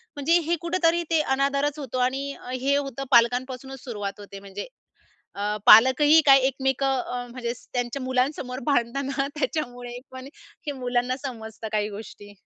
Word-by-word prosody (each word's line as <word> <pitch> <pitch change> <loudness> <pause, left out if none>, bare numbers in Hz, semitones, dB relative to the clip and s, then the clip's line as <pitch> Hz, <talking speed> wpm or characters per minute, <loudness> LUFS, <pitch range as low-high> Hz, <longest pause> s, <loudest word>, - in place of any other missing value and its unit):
म्हणजे 300 +4 +3
हे 340 - +2
कुठेतरी 340 0 +1
ते 325 -1 +3
अनादरच 280 +1 0
होतो. 260 -3 -5
आणि 270 +3 -1 0.3
हे 275 +2 +2
होतं 275 -2 -4
पालकांपासूनच 250 +2 +1
सुरुवात 205 -6 -5
होते 200 -1 -10
म्हणजे 195 0 -8 0.7
अ, 200 - -8 0.3
पालकही 260 +8 +8
काही 270 -1 +7
एकमेकं 265 0 0
अ, 245 0 -5
म्हणजे 235 -1 -4 0.2
त्यांच्या 245 +2 -2
मुलांसमोर 255 0 -1
भांडतात 275 -2 +1
ना 275 -1 +1
त्याच्यामुळे 245 -4 -3
पण 260 0 -9 0.4
हे 290 - -1
मुलांना 250 0 -1
समजतं 220 -4 -6
काही 210 -1 0
गोष्टी. 205 0 -10
260 Hz, 145 wpm, -25 LUFS, 240-280 Hz, 0.7 s, पालकही